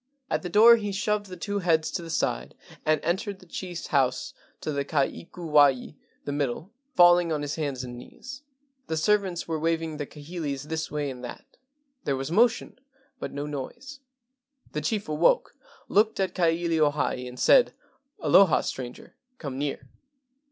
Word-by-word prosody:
At - - +1
the 180 - -5
door 225 +5 +8
he 205 -2 -3
shoved 205 +1 -1
the 185 -1 -9
two 205 +4 -2
heads 160 -3 +2
to 190 - -3
the 165 - -8
side 165 - -1 0.3
and 155 0 +4
entered 190 +4 -1
the 185 - -17
chief's 175 -1 -6
house 135 -3 +1 0.3
to 155 - -3
the 140 -1 -1
ka 140 0 +1
ikuwai 150 -4 +1 0.3
(the 145 - -2
middle), 145 +5 -2 0.2
falling 175 -1 +6
on 150 -2 -1
his 145 0 -3
hands 140 -5 -3
and 120 -1 -7
knees. 260 - -10 0.5
The 160 - -2
servants 190 0 +1
were 160 -1 -2
waving 165 -1 -1
the 145 -2 -4
kahilis 150 -2 -5
this 160 0 -2
way 145 -2 -2
and 125 -1 -10
that. 120 - -8 0.6
There 140 - 0
was 135 +3 -4
motion, 235 +5 +2 0.4
but - - -5
no 145 +1 -4
noise. 240 - -7 0.7
The - - -3
chief 215 -3 -1
awoke, 155 - +2 0.3
looked 215 +1 +2
at 190 -2 0
Ka 180 - +1
ilio 165 -2 +2
hae, 130 -3 -2
and 125 0 -10
said: - - +5 0.5
"Aloha, 165 +4 +5
stranger, 125 -1 -7 0.2
come 135 -4 -5
near. 145 -1 -3
160 Hz, 170 wpm, -27 LUFS, 145-190 Hz, 0.7 s, door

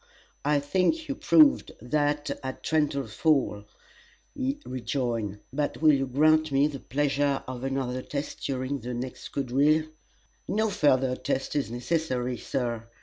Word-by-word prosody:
"I 145 +1 +3
think 185 - +1
you 280 - -1
proved 295 +1 +4
that 145 +3 0
at 130 -1 -6
Trenton 145 -3 +1
Falls," 115 -3 +1 0.7
he 275 0 -2
rejoined; 115 -5 -2
"but 145 +1 -1
will 155 -1 +6
you 135 -1 +1
grant 155 +3 +3
me 135 +1 +4
the 145 -2 -3
pleasure 140 +1 0
of 130 -1 -6
another 135 -2 -2
test 140 +2 -5
during 135 +1 -2
the 125 +1 -5
next 125 +1 -6
quadrille?" 145 +4 +2 0.6
"No 220 +1 +1
further 130 -6 +3
test 135 +2 -2
is 145 -5 0
necessary, 125 -1 -1
Sir. 120 -3 -3
140 Hz, 140 wpm, -27 LUFS, 125-150 Hz, 0.7 s, will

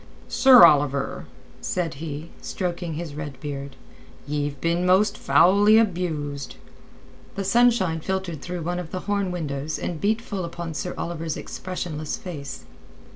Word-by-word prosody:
"Sir 255 -7 +8
Oliver," 145 -3 +2 0.3
said 175 -4 -2
he, 155 0 -6
stroking 175 -3 -3
his 160 -2 -5
red 145 -3 -7
beard, 140 -1 -6 0.5
"ye've 145 -1 -2
been 170 +3 0
most 190 +3 +4
foully 200 +5 +5
abused." 160 -9 -1 0.8
The 195 - -2
sunshine 195 -5 +3
filtered 180 -3 -3
through 180 0 -5
one 175 +2 -2
of 175 -3 -6
the 185 - -4
horn 200 -2 -1
windows 155 -4 -3
and 165 -3 -4
beat 215 +2 +2
full 200 -5 -5
upon 170 -1 -5
Sir 180 +4 -4
Oliver's 165 -2 -3
expressionless 165 -4 -5
face. 145 -7 -7
170 Hz, 135 wpm, -24 LUFS, 150-185 Hz, 0.8 s, Sir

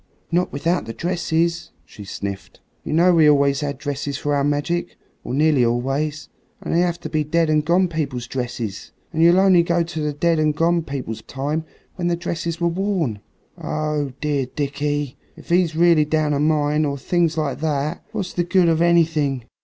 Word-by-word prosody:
"Not 175 +2 +1
without 165 +5 -1
the 115 - -7
dresses," 170 -1 -1 0.2
she 105 - -12
sniffed. 100 0 -6 0.2
"You - - -5
know 175 +3 +4
we 160 -3 +6
always 140 -1 +3
had 145 -2 -3
dresses 140 -1 -4
for 145 0 -1
our 140 -1 +1
magic, 145 +5 -1 0.3
or - - -6
nearly 145 -1 +3
always; 135 +6 -1 0.3
and - - -4
they 170 - +3
have 175 -1 +1
to - - -5
be 155 -1 0
dead 160 +1 +1
and 155 -1 +3
gone 175 +4 +3
people's 140 -7 -3
dresses, 120 -5 -5 0.2
and 160 - 0
you'll 170 +2 +6
only 190 -2 +5
go 170 0 +1
to 165 -1 -6
the 150 0 -1
dead 165 +3 +1
and 155 -1 +2
gone 170 +2 +2
people's 135 -7 -5
time 145 +4 -3 0.3
when 175 -2 -1
the 175 - +1
dresses 170 0 -4
were 170 - +2
worn. 170 - -1 0.4
Oh! 150 -3 -2
dear 145 -4 0
Dickie, 145 0 -2 0.2
and - - -14
if - - -9
he's 175 -2 +2
really 165 -2 +4
down 150 0 +1
a 140 - 0
mine, 150 0 +2
or 140 -2 -1
things 165 +2 0
like 150 -3 -1
that, 150 +1 -2
what's 200 -5 -4
the 175 - 0
good 175 0 +3
of 165 0 +2
anything?" 160 -6 +2
155 Hz, 195 wpm, -21 LUFS, 140-170 Hz, 0.4 s, we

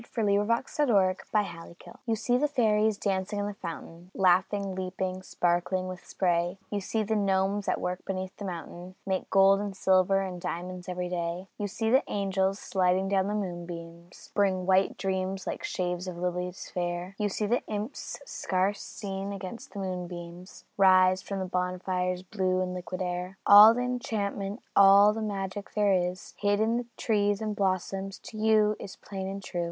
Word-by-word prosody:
FOR 230 - -3
DOLLY 200 -1 +3
WHO 205 - +1
DOES 230 +5 -1
NOT 295 - +4
LEARN 190 -4 +4 0.3
HER 170 -2 -9
LESSONS 175 +7 -14
YOU 225 - +2
see 235 +3 0
the 290 +4 +3
fairies 220 -6 +2
dancing 195 +1 -1
in 205 - -1
the 205 - -3
fountain, 170 -1 -8
Laughing, 190 +1 +2
leaping, 185 0 -3
sparkling 180 +1 0
with 185 -1 -7
the - - -23
spray; 175 0 0
You 205 -1 -1
see 220 +3 -1
the 220 +1 -1
gnomes, 195 0 +1
at - - +1
work 180 0 -3
beneath 185 -1 -4
the 205 - -6
mountain, 180 0 -7
Make 190 -1 -2
gold 195 0 +5
and 200 -2 -4
silver 190 0 +3
and 185 -2 -5
diamonds 180 +2 -5
every 180 0 -3
day; 175 +1 -3
You 205 - -1
see 220 +3 -1
the 260 +2 +6
angels, 195 -1 0
sliding 190 -1 +1
down 195 -1 +2
the 210 - -1
moonbeams, 175 -3 -7
Bring 190 -3 +1
white 190 +1 +3
dreams 190 0 -2
like - - -4
sheaves 180 0 -2
of 180 -2 -5
lilies 180 +1 -3
fair; 175 +1 -3
You 210 -1 +1
see 210 +2 -2
the 240 +4 +1
imps, 215 +4 -5
scarce 190 +2 -1
seen 195 -1 -5
against 195 +3 -7
the 200 - -6
moonbeams, 180 -1 -7
Rise 185 -1 +5
from 195 - -5
the 190 - -2
bonfire's 180 0 -1
blue 185 -1 0
and 180 0 -3
liquid 185 +1 -4
air. 180 +1 -4
All 210 +3 +10
the 245 - -1
enchantment, 220 -4 -3
all 200 +1 +7
the 225 - -4
magic 200 -1 -4
there 205 -2 +3
is 180 0 -1
Hid 205 0 +2
in 230 +2 +1
trees 205 -2 +1
and 215 -1 -3
blossoms, 195 0 -1
to 220 - -9
you 215 -1 +3
is 190 - -8
plain 190 -1 -6
and 195 0 -5
true. 175 - -4
190 Hz, 185 wpm, -28 LUFS, 180-205 Hz, 0.3 s, All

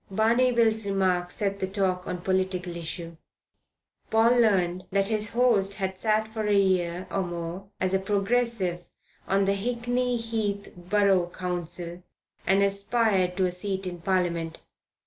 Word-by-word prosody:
Barney 230 +5 +3
Bill's 225 -2 +3
remark 185 -3 +1
set 200 +1 -2
the 190 - -1
talk 185 -2 -1
on 180 - -4
political 185 -1 0
lines. 170 0 -5 0.9
Paul 225 +1 +4
learned 185 -5 +1
that 195 +1 +1
his 215 -1 0
host 225 -5 +3
had 190 -1 -3
sat 220 0 +1
for 220 -1 -3
a 205 -1 +3
year 185 -2 +1
or 195 - 0
more 175 +1 -5
as 185 0 0
a 190 - +3
Progressive 200 -3 0 0.4
on 195 +1 +2
the 195 - +2
Hickney 245 +3 -1
Heath 220 -3 -3
Borough 185 0 +2
Council 175 -1 -4 0.5
and 195 +1 +4
aspired 200 -2 +1
to 190 - +3
a 180 - 0
seat 190 +1 -3
in 175 -2 -5
Parliament. 170 -3 -1
195 Hz, 145 wpm, -27 LUFS, 180-215 Hz, 0.9 s, Paul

